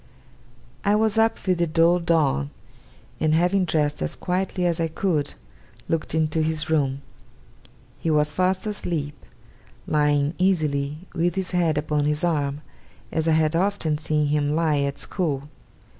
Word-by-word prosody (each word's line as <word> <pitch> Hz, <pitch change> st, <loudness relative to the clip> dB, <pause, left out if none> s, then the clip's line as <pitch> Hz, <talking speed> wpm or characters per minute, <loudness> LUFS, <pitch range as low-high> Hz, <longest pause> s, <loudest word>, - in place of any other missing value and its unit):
I 205 Hz, +1 st, +3 dB
was 220 Hz, 0 st, +2 dB
up 225 Hz, 0 st, +3 dB
with 185 Hz, -2 st, +1 dB
the 170 Hz, -, +2 dB
dull 165 Hz, +2 st, +3 dB
dawn, 155 Hz, -, +1 dB, 0.7 s
and, 155 Hz, 0 st, +2 dB
having 180 Hz, +3 st, +2 dB
dressed 150 Hz, -3 st, 0 dB
as -, -, -2 dB
quietly 185 Hz, 0 st, -1 dB
as 170 Hz, -1 st, 0 dB
I 165 Hz, -, +1 dB
could, 160 Hz, -3 st, -1 dB, 0.5 s
looked 160 Hz, -1 st, -1 dB
into 160 Hz, 0 st, +1 dB
his 155 Hz, 0 st, -1 dB
room. 140 Hz, -3 st, 0 dB, 1.0 s
He 165 Hz, -, -2 dB
was 150 Hz, -1 st, +2 dB
fast 185 Hz, +1 st, 0 dB
asleep; 170 Hz, -8 st, -3 dB, 0.7 s
lying, 150 Hz, 0 st, +2 dB
easily, 150 Hz, -6 st, +1 dB, 0.2 s
with 175 Hz, 0 st, 0 dB
his 190 Hz, -2 st, -3 dB
head 170 Hz, -4 st, +1 dB
upon 150 Hz, -1 st, 0 dB
his 150 Hz, +2 st, 0 dB
arm, 145 Hz, -4 st, 0 dB, 0.5 s
as 160 Hz, 0 st, -1 dB
I 160 Hz, -, +4 dB
had 155 Hz, 0 st, +2 dB
often 170 Hz, -5 st, 0 dB
seen 150 Hz, -1 st, 0 dB
him 145 Hz, 0 st, +1 dB
lie 155 Hz, -3 st, +2 dB
at 140 Hz, 0 st, -1 dB
school. 145 Hz, -6 st, -2 dB
160 Hz, 150 wpm, -24 LUFS, 150-175 Hz, 1.0 s, I